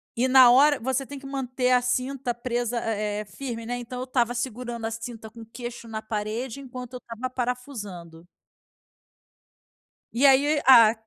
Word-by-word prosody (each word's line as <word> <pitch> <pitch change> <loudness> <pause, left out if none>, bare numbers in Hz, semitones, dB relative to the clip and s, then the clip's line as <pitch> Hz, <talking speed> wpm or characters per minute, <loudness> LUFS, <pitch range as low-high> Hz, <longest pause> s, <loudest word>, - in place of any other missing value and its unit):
E 245 +3 +2
na 255 -2 +8
hora 290 +3 +5
você 265 +3 -1
tem 285 - -8
que 275 - -12
manter 260 -2 -1
a 250 - +5
cinta 250 0 -1
presa, 240 0 -2
eh 210 -2 -2
eh, - - -8
firme, 230 +1 -6
né. 245 +1 -3
Então 245 +1 -7
eu 255 - -3
estava 245 -2 0
segurando 240 -1 -4
a 225 - -2
cinta 225 -1 -7
com 230 +1 -12
queixo 240 +1 -8
na 220 -1 -5
parede 220 +4 -4
enquanto 255 -2 -9
eu 250 - -6
estava 240 +2 -6
parafusando. 210 -10 -5 1.9
E 255 +4 +2
aí, 285 +2 +4
a 230 -4 +8
245 Hz, 170 wpm, -25 LUFS, 225-260 Hz, 1.9 s, na